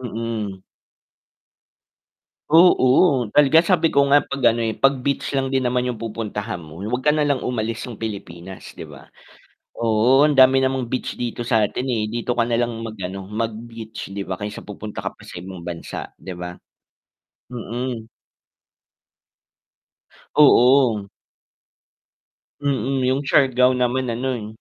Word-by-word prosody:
Mm. 110 -5 -4 1.9
Oo, 140 -5 +5
talaga 150 +1 +5
sabi 170 -3 +3
ko 140 0 +3
nga, 145 - +7
'pag 140 - -6
ano 120 - -2
eh, 110 -1 -2
'pag 135 -1 +2
beach 140 +1 -2
lang 135 -1 0
din 130 -1 0
naman 125 0 +1
'yung 120 - -4
pupuntahan 105 -3 -5
mo 80 0 -12
huwag 110 +7 -3
ka 150 - +3
na 150 0 +2
lang 140 -3 0
umalis 115 -2 -3
ng 115 - -8
Pilipinas 95 -4 -7
'di - - -7
ba? - - -14 0.7
Oo 115 +5 +4
ang 150 - +1
dami 130 0 +6
namang 130 -2 -1
beach 130 - -3
dito 120 0 -4
sa'tin, 115 +2 +1
eh, 110 -4 -1
dito 120 +1 -2
ka 120 - +2
na 115 0 0
lang 120 -1 0
mag-ano, 95 -3 -6
mag-beach 115 0 -6
'di 100 0 -5
ba 95 - -3
kaysa 105 0 -6
pupunta 105 +1 -8
ka - - -3
pa - - -19
sa - - -9
ibang 90 -1 -9
bansa 85 -1 -6
'di 95 -2 -8
ba? 90 0 -7 0.9
Mm. 120 -1 -5 2.3
Oo. 125 -7 +5 1.6
Mm. 135 -1 0
'Yung 130 +2 +1
Siagao 130 -3 +4
naman 125 +1 0
ano, 120 +3 -2
eh, 105 -2 -6
120 Hz, 145 wpm, -21 LUFS, 105-130 Hz, 2.3 s, nga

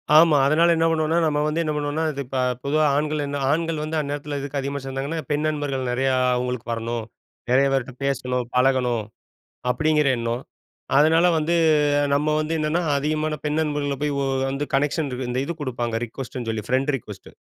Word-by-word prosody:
ஆமா. 155 -1 +7
அதனால 165 +4 +4
என்ன 165 0 +2
பண்ணுவோன்னா, 160 0 +1
நம்ம 150 -2 +1
வந்து 155 +2 0
என்ன 155 - -1
பண்ணுவோன்னா, 150 +2 -1
இது 140 -1 -5
இப்ப 130 +1 -3 0.3
பொதுவா 155 +2 +2
ஆண்கள் 150 0 -1
என்ன 140 0 -3
ஆண்கள் 165 0 -1
வந்து 155 +1 -2
அந்நேரத்தில 145 0 -4
எதுக்கு 140 0 -3
அதிகமா 140 +1 -3
சேர்ந்தாங்கன்னா? 135 +4 -3
பெண் 150 +1 0
நண்பர்கள் 145 -4 -2
நெறையா 130 +2 +1 0.2
அவுங்களுக்கு 125 -1 -3
வரணும். 115 0 -3 0.5
நெறைய 135 +2 +5
பேர்ட்ட 135 -1 -1
பேசணும், 125 -2 -1
பழகணும். 125 -3 +2 0.7
அப்பிடிங்கிற 150 +3 +2
எண்ணம். 115 +2 -2 0.5
அதனால 160 +4 +5
வந்து 160 +2 +1 0.6
நம்ம 150 +2 +1
வந்து 155 +1 -2
என்னென்னா, 155 +3 0
அதிகமான 155 +2 -1
பெண் 150 +1 0
நண்பர்கள 145 -2 -1
போய் 150 -1 0
ஓ - - 0 0.3
வந்து 140 +2 -2
கனெக்ஷன் 145 +2 0
இருக்கு 125 0 -4
இந்த 125 +2 0
இது 170 - -3
குடுப்பாங்க. 120 -4 -2
ரிக்கொஸ்ட்டுன்னு 120 0 -6
சொல்லி, 110 -2 -3
ஃப்ரெண்ட் 135 +3 +1
ரிக்கொஸ்ட்டு. - - -12
145 Hz, 170 wpm, -23 LUFS, 130-155 Hz, 0.7 s, ஆமா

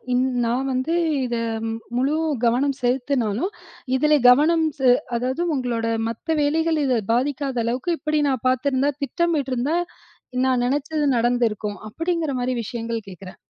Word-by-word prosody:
இன் 250 +1 +3 0.2
நான் 250 +4 0
வந்து 260 +6 -1 0.3
இத 240 -1 -2 0.6
முழு 270 +4 +1 0.3
கவனம் 260 +4 +2
செலுத்தினாலும், 250 - 0 0.5
இதுல 300 +2 +4
கவனம் 310 +6 +5
செ 265 - 0 0.3
அதாவது 255 +7 -1
உங்களோட 240 -4 -1 0.2
மத்த 310 +8 -2
வேலைகள் 320 +2 +1
இத 255 -4 +2
பாதிக்காத 270 +1 -1
அளவுக்கு 250 +9 -1
இப்டி 305 -1 0
நான் 260 -3 -2
பாதுருந்தா, 260 +2 +2
திட்டமிட்டிருந்தா, 290 -3 0 0.7
நான் 255 -2 +2
நெனைச்சது 295 +3 -1
நடந்திருக்கும் 230 -4 0
அப்டிங்குற 330 +4 -2
மாரி 250 +1 0
விஷயங்கள் 230 -1 -4
கேட்குறேன். 185 0 -11
260 Hz, 125 wpm, -22 LUFS, 240-295 Hz, 0.7 s, கவனம்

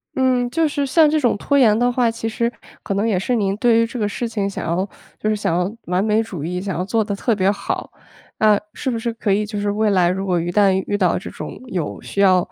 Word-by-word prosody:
嗯， 255 -2 +2
就 325 +5 +1
是 285 -1 -1
像 310 +3 +4
这 310 - +2
种 245 -7 +1
拖 280 +7 +1
延 220 -6 +5
的 245 +1 +2
话， 245 -2 +2
其 225 0 -4
实 235 +1 -1 0.3
可 195 - -2
能 205 +3 +1
也 210 -5 +1
是 220 +7 -1
您 200 -4 +1
对 230 0 +4
于 230 - +3
这 235 - -7
个 210 -3 0
事 235 +3 -3
情 210 -3 -2
想 195 - -5
要 175 +3 0 0.3
就 215 - -1
是 215 - +2
想 170 -5 0
要 180 +3 -1
完 180 +2 0
美 215 +1 +2
主 190 -9 -6
义， 180 +3 -3
想 190 -2 -3
要 180 - -1
做 220 +4 0
得 205 -1 -2
特 230 +4 0
别 195 -2 +2
好。 200 0 -3 0.5
那 210 -2 +5
是 265 - -3
不 240 - -1
是 235 0 -2
可 215 -2 -1
以 205 +2 +2
就 210 0 -6
是 205 0 -1
未 215 +1 +1
来 180 -3 +3
如 190 +2 -2
果 180 -3 +1
一 175 +1 -3
旦 200 +1 +4
遇 205 - 0
到 185 -4 +2
这 180 - -6
种 - - -8
有 180 - -4
需 - - -6
要， 190 -2 +6
210 Hz, 290 characters per minute, -20 LUFS, 195-235 Hz, 0.5 s, 要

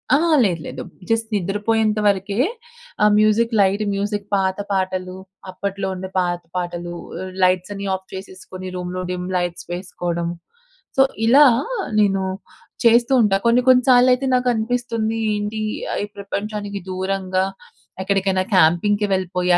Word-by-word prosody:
ఆ - - +5 0.3
లేదు 170 -6 0
లేదు. 130 0 -6 0.3
జస్ట్ 225 0 +1
నిద్రపోయేంతవరకే 205 0 0 0.7
ఆ - - +6
మ్యూజిక్ 215 +2 +3
లైట్ 200 +2 +3
మ్యూజిక్ 205 0 -2
పాత 190 -1 0
పాటలు, 185 -1 -2 0.4
అప్పట్లో 195 +1 -3
ఉండే 185 0 -6
పాత 175 -1 -1
పాటలు 175 -1 -4 0.3
అహ్, 185 0 -7
లైట్సన్ని 185 +2 +1
ఆఫ్ 190 0 -10
చేసేసుకొని 185 -1 -8
రూమ్‌లో 180 0 -4
డిమ్ 180 0 -4
లైట్స్ 175 -1 -3
వేసుకోవడం. 175 -1 -3 0.7
సో, - - +6 0.2
ఇలా, 275 +6 +7 0.5
నేను 195 -2 +2 0.6
చేస్తూ 235 +2 +5
ఉంటా. 205 -3 +3
కొన్ని 235 +2 +4
కొన్ని 250 -1 +6
సార్లయితే 250 +1 +5
నాకనిపిస్తుంది 230 -2 0 0.2
ఏంటి 210 +1 -3 0.4
ఈ - - -1
ప్రపంచానికి 200 0 -4
దూరంగా 190 0 -1 0.6
ఎక్కడికైనా 190 -1 +1
క్యాంపింగ్‌కి 200 +5 +3
వెళ్ళిపోయి 180 -1 0
195 Hz, 120 wpm, -21 LUFS, 185-215 Hz, 0.7 s, ఇలా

